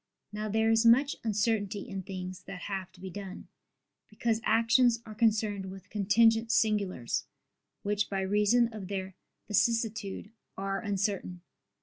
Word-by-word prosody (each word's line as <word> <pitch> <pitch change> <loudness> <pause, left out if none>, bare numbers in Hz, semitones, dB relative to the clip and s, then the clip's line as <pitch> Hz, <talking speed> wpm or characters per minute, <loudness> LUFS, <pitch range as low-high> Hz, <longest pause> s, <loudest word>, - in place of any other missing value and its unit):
Now 215 0 -3
there 220 +1 +2
is 225 +1 +4
much 255 +5 +5
uncertainty 210 -2 0
in 195 - -5
things 185 -1 -7
that 180 -2 -8
have 195 -2 -4
to - - -18
be 190 0 -7
done; 195 0 -8 0.6
because 225 +1 -1
actions 230 +1 +4
are 215 - -8
concerned 210 -3 +1
with 190 0 -11
contingent 225 +2 +3
singulars, 200 - +1 0.6
which 205 0 0
by 195 -1 -1
reason 210 +4 +3
of 205 -4 -7
their 190 -1 -4 0.3
vicissitude, 215 -1 0 0.3
are 195 0 -2
uncertain. 200 -4 -2
210 Hz, 135 wpm, -30 LUFS, 195-225 Hz, 0.6 s, much